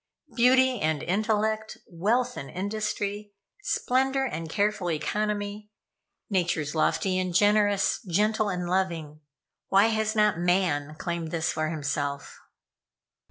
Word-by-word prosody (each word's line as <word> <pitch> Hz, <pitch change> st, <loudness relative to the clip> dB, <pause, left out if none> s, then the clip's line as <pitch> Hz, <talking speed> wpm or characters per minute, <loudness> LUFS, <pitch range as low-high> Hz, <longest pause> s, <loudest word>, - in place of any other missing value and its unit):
Beauty 255 Hz, 0 st, +4 dB
and 155 Hz, -2 st, 0 dB
intellect, 215 Hz, +2 st, 0 dB
wealth 230 Hz, +8 st, 0 dB
and 135 Hz, -, -7 dB
industry, 205 Hz, +1 st, -3 dB, 0.3 s
splendor 265 Hz, -5 st, +1 dB
and 165 Hz, -9 st, -4 dB
careful 205 Hz, -1 st, 0 dB
economy, 205 Hz, +5 st, -2 dB, 0.6 s
natures 170 Hz, -6 st, 0 dB
lofty 185 Hz, +3 st, +1 dB
and 185 Hz, -2 st, -2 dB
generous, 205 Hz, 0 st, +3 dB
gentle 210 Hz, +4 st, +1 dB
and 180 Hz, -2 st, -3 dB
loving 170 Hz, -5 st, -2 dB, 0.5 s
why 200 Hz, +3 st, +4 dB
has 220 Hz, 0 st, 0 dB
not 210 Hz, -5 st, +3 dB
Man 175 Hz, -5 st, +1 dB
claimed 170 Hz, -1 st, -3 dB
this 165 Hz, +1 st, -1 dB
for 155 Hz, 0 st, -1 dB
himself? 145 Hz, -2 st, -3 dB
195 Hz, 115 wpm, -27 LUFS, 165-215 Hz, 0.6 s, Beauty